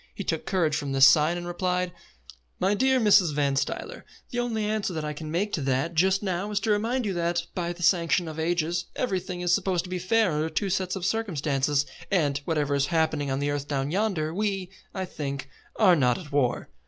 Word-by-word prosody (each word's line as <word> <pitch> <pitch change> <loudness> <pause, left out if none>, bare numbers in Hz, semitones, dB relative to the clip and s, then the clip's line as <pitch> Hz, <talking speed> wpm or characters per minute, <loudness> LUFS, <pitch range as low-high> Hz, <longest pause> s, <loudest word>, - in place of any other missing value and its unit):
He 200 - -4
took 160 -3 -3
courage 170 -6 +1
from 140 -2 -3
this 135 0 +7
sign, 155 +5 +5
and 175 - -5
replied: 180 0 -1 0.7
"My 195 +2 +2
dear 260 +4 +3
Mrs. 200 -8 +4
Van 140 -2 +1
Stuyler, 135 0 -3 0.3
the 245 - -2
only 225 -3 -1
answer 210 -3 -1
that 155 -2 -3
I 150 - -3
can 155 +1 -7
make 195 +6 -1
to 160 - -1
that 135 +5 0
just 190 +4 +2
now 190 +1 -2
is 210 -1 0
to 220 - 0
remind 230 +4 0
you 200 - -1
that, 170 0 -1
by 175 -1 -2
the 175 0 -7
sanction 170 -1 +3
of 160 0 -6
ages, 170 +1 0
everything 185 -5 -2
is 175 -1 +2
supposed 185 -2 +1
to 180 - -10
be 180 - -2
fair 215 +2 +2
under 155 +1 -1
two 190 +5 -1
sets 185 0 -1
of 185 -2 -4
circumstances, 150 -9 0 0.2
and, 145 -7 +1
whatever 150 -3 0
is 140 0 +1
happening 160 -3 0
on 135 - 0
the 145 +1 -1
earth 145 -1 -3
down 140 0 -2
yonder, 185 -5 0
we, 195 -2 -2 0.2
I 190 -1 -3
think, 140 -5 -5 0.3
are 190 -5 +5
not 125 -5 +2
at 155 -5 -10
war." 140 -4 0
175 Hz, 215 wpm, -26 LUFS, 150-190 Hz, 0.7 s, this